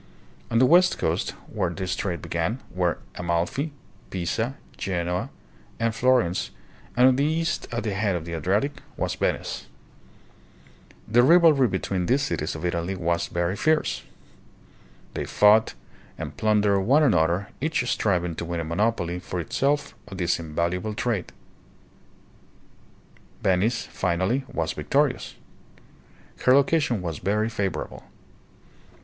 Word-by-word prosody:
On 115 - +1
the 130 - +6
west 180 +6 +5
coast, 80 +1 -1
where 95 -5 -2
this 90 +1 -3
trade 90 -4 -3
began, 85 +9 -1
were 90 -2 0 0.2
Amalfi, 85 - -1 0.4
Pisa, 110 +8 -2 0.2
Genoa, 90 -1 -2 0.5
and 115 0 +1
Florence, 120 -7 +2 0.5
and 125 +1 +7
on 130 - +5
the 140 - +2
east, 160 +2 0
at 120 -1 -2
the 105 -3 -1
head 100 -1 0
of 85 -2 -4
the 85 - -6
Adriatic, 105 - 0 0.2
was - - -1
Venice. - - -2 1.4
The 120 +3 +5
rivalry 155 -2 +6
between 95 -2 -2
these 135 +3 +2
cities 80 - -2
of 80 +2 -5
Italy 85 +2 -1
was 85 -1 0
very 85 +2 -1
fierce. 155 +7 +1 1.1
They - - -3
fought 105 +2 +4 0.4
and - - -6
plundered 105 -2 +2
one 140 +9 +4
another, 90 - +2
each 150 -5 0
striving 90 -7 +1
to 85 - -3
win 85 0 -3
a - - -2
monopoly 90 0 0
for 90 0 -5
itself 140 - 0
of 95 -2 -8
this 90 -2 +1
invaluable 85 +6 -2
trade. 120 -6 -2 2.1
Venice, 100 +6 +2
finally, 95 +9 -1
was - - -1
victorious. - - 0 1.1
Her 125 - +7
location 140 - +2
was 80 -4 -4
very 105 +3 0
favorable. 100 -4 -3
100 Hz, 130 wpm, -25 LUFS, 85-125 Hz, 2.1 s, and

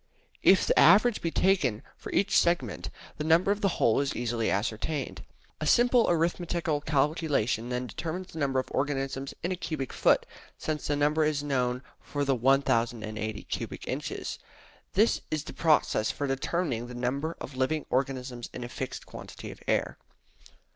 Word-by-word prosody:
If 190 - +6
the - - +3
average 210 +7 +6
be 165 - 0
taken 155 - +2
for - - -9
each 200 0 +2
segment, 155 - +1 0.3
the - - -3
number 165 +5 +4
of 205 +1 -1
the 195 -3 +1
whole 115 - +3
is 140 - -2
easily 120 -1 -1
ascertained. 115 +8 -2 0.4
A 155 - -2
simple 240 +3 +5
arithmetical 170 -2 0
calculation 145 -6 0
then 125 0 -2
determines 175 +8 -5
the 160 - -6
number 135 -2 0
of 130 - -2
organisms 135 -1 -2
in 175 - -1
a - - 0
cubic 155 -7 -4
foot, - - +3 0.3
since 155 -1 -3
the 145 - +1
number 150 +2 +2
is 150 -2 0
known 125 -2 0 0.2
for 145 -1 -2
the 135 - +3
1080 115 -4 +1
cubic - - -5
inches. - - -4 0.5
That 215 +4 +3
is 155 -2 -2
the - - -8
process 155 -8 +2
for 145 - -2
determining 135 -2 -1
the 125 - -8
number 140 +7 -2
of 130 - -7
living 140 +4 0
organisms 125 -2 -2
in - - -5
a 120 - -6
fixed - - -5
quantity - - -9
of - - -13
air. - - 0
140 Hz, 165 wpm, -28 LUFS, 125-165 Hz, 0.5 s, If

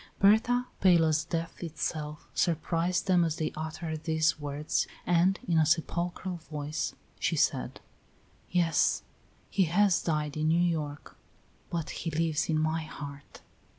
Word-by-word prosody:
Berta, 225 +5 +4
pale 175 -3 +5
as 155 -1 +2
death 165 0 -4
itself, 155 -2 -4
surprised 170 +2 0
them 180 -3 +4
as 160 -2 0
they 155 -1 -2
uttered 160 0 -5
these 160 0 +2
words, 145 +1 -1 0.2
and 175 +2 +3
in 165 -2 +3
a - - +5
sepulchral 175 +2 -1
voice 150 -2 -4 0.2
she - - +1
said: - - 0 0.7
"Yes, 170 -3 +2 0.5
he 190 -2 +3
has 185 +2 +3
died 150 -2 -1
in 155 0 +1
New 160 +2 +4
York, 155 -4 -2 0.5
but 165 -2 -3
he 165 - -4
lives 160 0 0
in 155 -1 +2
my 155 +1 0
heart." 145 -2 -9
165 Hz, 140 wpm, -29 LUFS, 155-175 Hz, 0.7 s, pale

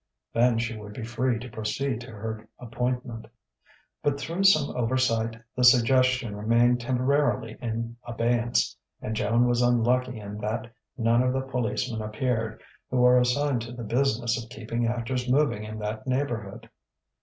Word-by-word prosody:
Then 120 0 +3
she 115 0 -2
would 105 -1 -9
be 115 - -6
free 120 +1 0
to 120 +3 -7
proceed 110 +3 -2
to 125 - -10
her 110 0 -6
appointment. 125 -1 -3 0.7
But 145 -1 0
through 170 +6 -2
some 155 -7 +4
oversight 115 -2 0 0.2
the 125 - 0
suggestion 130 -1 +4
remained 120 +3 +3
temporarily 130 -2 +1
in 115 0 -4
abeyance; 120 0 0 0.2
and 110 - -4
Joan 115 +3 +2
was 120 0 +2
unlucky 125 +1 +2
in 105 0 -7
that 110 +2 -3 0.2
none 115 0 +3
of 125 0 +1
the 135 - 0
policemen 125 -3 -2
appeared, 110 +1 -2 0.3
who 125 -1 +3
are 125 0 +7
assigned 125 +1 +1
to 115 +2 -7
the 120 -1 -7
business 120 0 0
of 115 - -15
keeping 115 +1 -3
actors 125 +2 -2
moving 135 -6 +2
in 110 0 -6
that 110 +2 -5
neighbourhood. 120 -6 -3
120 Hz, 155 wpm, -26 LUFS, 115-125 Hz, 0.7 s, are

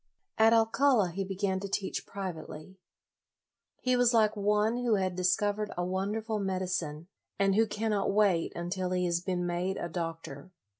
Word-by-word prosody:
At 220 +1 +6
Alcala 225 -2 +3
he 195 +3 -3
began 190 0 -1
to 200 - -5
teach 195 0 -3
privately. 185 -1 -7 1.0
He 255 0 +2
was 245 -1 +3
like 215 -1 +4
one 210 +3 +1
who 245 -3 +2
had 185 -2 -1
discovered 205 +3 0
a 175 - 0
wonderful 210 +4 -2
medicine, 180 -5 -2 0.3
and 195 0 +2
who 220 +3 +3
cannot 210 -1 -1
wait 195 -5 +2
until 180 +1 -3
he 180 0 +1
has 170 -1 0
been 180 -1 -2
made 175 +2 -2
a - - -3
doctor. 165 -3 -6
195 Hz, 155 wpm, -30 LUFS, 180-215 Hz, 1.0 s, At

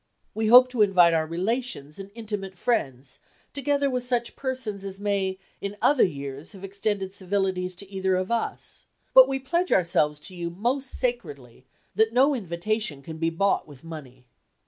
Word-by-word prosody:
We 220 0 -1
hope 250 +3 +9
to 250 -3 -1
invite 180 -4 +5
our 160 -1 +1
relations 185 - -3
and 195 0 -8
intimate 205 -4 -5
friends, 135 - -2 0.3
together 280 0 0
with 250 -2 -1
such 245 -1 -1
persons 255 -7 -4
as 195 0 -7
may 200 -2 -1 0.2
in 200 +1 -5
other 285 -3 +4
years 140 +1 -4
have 195 -1 -12
extended 200 -1 -3
civilities 185 -1 -1
to 200 +2 -6
either 190 -1 0
of 185 +3 -2
us; 235 -1 -3 0.3
but 260 0 +9
we 270 0 -1
pledge 340 +7 -1
ourselves 155 -4 +2
to 185 +4 -5
you 170 -1 -4
most 245 +9 -1
sacredly 145 - -4 0.3
that 220 +3 +2
no 270 +4 +4
invitation 185 - -2
can 160 +2 -8
be 165 0 +1
bought 195 +4 0
with 145 -2 -14
money. 135 -6 -10
195 Hz, 170 wpm, -25 LUFS, 170-235 Hz, 0.3 s, hope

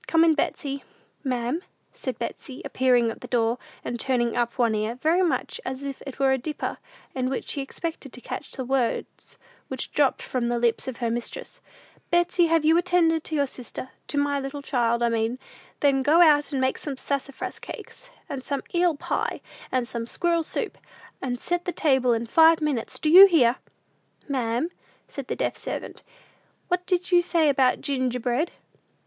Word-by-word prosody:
Come 330 0 +4
in, 330 -1 +5
Betsey." 280 -2 -2 0.4
"Ma'am?" 255 +4 -1 0.3
said - - -5
Betsey, 265 -4 -6
appearing 245 -3 +3
at - - -10
the - - -8
door, 235 0 +1 0.3
and 240 - -3
turning 240 -2 +1
up 240 -1 -1
one 235 -3 +3
ear, 215 +2 -1
very 320 +8 +2
much 365 +6 -1
as 260 +1 -5
if 275 -1 -5
it 270 - -7
were 270 -1 +3
a 265 - +2
dipper, 300 +4 -4 0.3
in 255 -1 -1
which 270 - -3
she 280 - -1
expected 290 0 -5
to - - -9
catch - - -7
the 260 - -4
words 255 -2 -2 0.3
which 265 - -4
dropped 285 -3 +2
from 250 -2 -1
the 240 0 0
lips 235 +1 +1
of 260 -3 -4
her 235 -1 -1
mistress. 235 0 -5 0.5
"Betsey, 345 0 +3
have 325 -1 +2
you 325 +2 +5
attended 340 -3 +2
to 315 - -2
your 285 -1 +3
sister 255 0 -8 0.2
to 290 - -3
my 285 0 +1
little 275 +1 -5
child, 240 -3 +1
I 235 - +3
mean? 230 +1 0 0.4
Then 275 -2 +4
go 300 +5 +4
out 300 -4 +5
and 275 - -1
make 260 0 +1
some 280 -3 -5
sassafras 275 -1 -4
cakes, - - -10 0.2
and 265 -2 -5
some 280 -1 -3
eel 345 -2 +3
pie, - - -2 0.3
and 255 -2 0
some 230 -1 -4
squirrel 340 +4 +1
soup; 315 - -4 0.4
and 245 -2 -2
set 350 +4 -2
the 360 - -1
table 265 -7 +2
in 230 0 -1
five 320 +6 +6
minutes: 295 -7 -2
do - - -2
you 370 +5 +11
hear?" 265 -9 +4 0.7
"Ma'am?" 255 +3 -1 0.4
said - - -7
the - - -2
deaf - - -1
servant; - - -6 0.7
"what 360 0 0
did 365 0 0
you 350 -1 +6
say 335 -3 +2
about 265 -2 +3
ginger 255 -3 -1
bread?" 250 +8 0
270 Hz, 185 wpm, -25 LUFS, 245-320 Hz, 0.7 s, you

